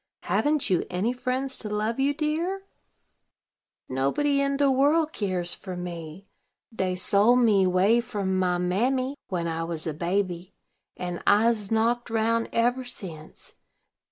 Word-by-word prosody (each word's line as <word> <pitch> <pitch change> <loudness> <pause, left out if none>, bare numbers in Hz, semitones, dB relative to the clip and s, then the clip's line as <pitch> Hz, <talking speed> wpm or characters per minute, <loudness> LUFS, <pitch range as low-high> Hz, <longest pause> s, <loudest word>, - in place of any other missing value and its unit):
Haven't 295 -1 +1
you 180 - +3
any 195 +7 0
friends 255 +1 -2
to 210 - -5
love 215 +3 -1
you, 275 +1 +3
dear?" 320 +6 -2 1.2
"Nobody 210 - +1
in 275 0 0
de 280 -1 +3
world 300 +4 +3
keres 185 -4 -1
fer 185 -2 -7
me. 175 0 -7 0.5
Dey 185 -4 -1
sold 205 +6 +4
me 205 -5 +4
way 190 +6 +3
from 195 -5 -2
my 180 -1 +1
mammy 255 +10 0
when 170 -3 -2
I 165 0 -2
was 165 -1 -4
a 160 - -2
baby, 180 +2 -2 0.4
and 180 -1 -4
I'se 215 0 +3
knocked 235 +2 +1
roun 230 +1 +1
eber 245 +3 +1
since. 175 -11 -9
210 Hz, 140 wpm, -26 LUFS, 180-255 Hz, 1.2 s, sold